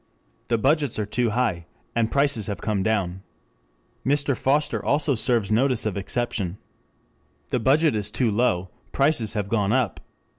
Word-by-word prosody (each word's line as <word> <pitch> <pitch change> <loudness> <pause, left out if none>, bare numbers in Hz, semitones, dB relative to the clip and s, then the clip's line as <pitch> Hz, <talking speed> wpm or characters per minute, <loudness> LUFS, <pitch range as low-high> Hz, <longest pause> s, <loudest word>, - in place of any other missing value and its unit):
The 115 - +1
budgets 145 +3 +1
are 105 - -1
too 120 +3 0
high, 105 -8 -1 0.3
and 115 -1 +1
prices 140 -7 +1
have 100 - -4
come 105 -3 -1
down. 95 -3 -1 0.8
Mr. 140 0 +1
Foster 145 +5 0
also 145 0 +2
serves 115 -3 +1
notice 125 +1 +2
of 110 - -1
exception. 100 -2 -2 0.9
The 125 - 0
budget 145 +3 +3
is 105 -1 -1
too 115 +1 0
low, 105 -5 +1 0.2
prices 135 -6 +2
have 105 -2 -2
gone 105 -2 +1
up. 125 -5 0
115 Hz, 150 wpm, -24 LUFS, 105-135 Hz, 0.9 s, budget